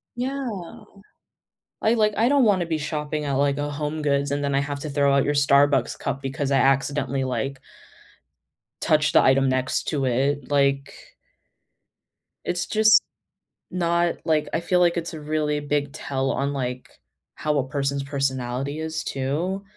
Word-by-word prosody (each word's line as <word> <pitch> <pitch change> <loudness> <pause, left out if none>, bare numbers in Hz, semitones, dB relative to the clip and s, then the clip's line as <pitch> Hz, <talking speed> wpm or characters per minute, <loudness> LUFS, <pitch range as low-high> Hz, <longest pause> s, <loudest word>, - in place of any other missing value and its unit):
Yeah. 245 -8 -4 1.0
I 220 - +3
like 215 -2 +2
I 230 +4 +3
don't 280 -4 +4
wanna 190 -5 +3
be 160 -1 -1
shopping 150 0 -3
at 140 - -1
like, 140 +1 +1
a 145 0 -2
HomeGoods 145 -1 -1
and 145 0 -1
then 140 -1 0
I - - +3
have 140 0 -4
to 155 - -5
throw 140 -1 +2
out 140 - +4
your 145 - +1
Starbucks 140 -3 +3
cup 135 - -3
because 135 +1 -3
I 135 - +4
accidentally, 135 -1 +1
like 135 +1 -3 1.2
touched - - +2
the - - +7
item 135 +1 +4
next 130 0 0
to 145 -4 -1
it, 135 +2 0
like 140 0 0 1.3
It's 175 0 -1
just 220 0 +5 0.7
not 170 -1 +1
like 155 -2 +1
I - - +1
feel 180 +1 +1
like 175 -1 +3
it's 170 0 -3
a 155 - -7
really 150 -1 -1
big 145 -1 -2
tell 135 -1 -2
on, 140 +1 -1
like, 125 -2 -4 0.5
how 150 -1 -1
a 130 - 0
person's 140 0 -1
personality 135 0 -2
is 160 0 -3
too. 160 +9 -2
145 Hz, 160 wpm, -24 LUFS, 135-160 Hz, 1.3 s, the